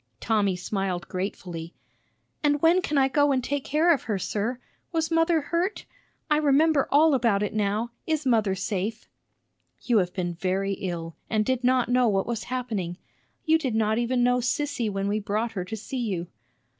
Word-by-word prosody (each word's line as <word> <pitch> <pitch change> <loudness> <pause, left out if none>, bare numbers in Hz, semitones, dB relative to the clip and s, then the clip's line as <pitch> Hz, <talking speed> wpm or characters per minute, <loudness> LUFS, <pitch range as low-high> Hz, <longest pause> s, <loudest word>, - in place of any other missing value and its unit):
Tommy 205 -4 +1
smiled 185 -1 -3
gratefully. 180 -3 -5 0.7
"And 290 0 +3
when 340 +3 +5
can 300 -4 -1
I 270 -1 +5
go 290 +1 +3
and 260 -2 +1
take 285 +1 -2
care 320 +4 +3
of 280 - -3
her, 210 -3 -1
sir? 220 +6 -2 0.3
Was 325 -1 -1
mother 330 0 +3
hurt? 345 +7 -2 0.4
I 300 - +3
remember 300 0 +3
all 305 +2 +5
about 230 -6 +2
it 210 - -2
now. 215 +2 -1 0.2
Is 310 -2 0
mother 220 -6 +2
safe?" 200 +3 -3 0.8
"You 235 -4 +3
have 180 -2 0
been 175 -2 -3
very 190 +3 -1
ill, 170 -4 -5
and 215 -1 +1
did 260 0 0
not 255 -1 +3
know 250 0 +3
what 195 -3 +1
was 230 -2 -3
happening. 220 -9 -3 0.5
You 320 0 +4
did 260 -8 -2
not 220 0 +2
even 245 +1 +1
know 250 0 +3
Sissy 255 -1 -1
when 195 0 -2
we 210 +1 0
brought 215 +3 -2
her 195 -5 -3
to 220 +4 -5
see 255 +5 -5
you." 190 -7 -2
230 Hz, 180 wpm, -26 LUFS, 195-280 Hz, 0.8 s, when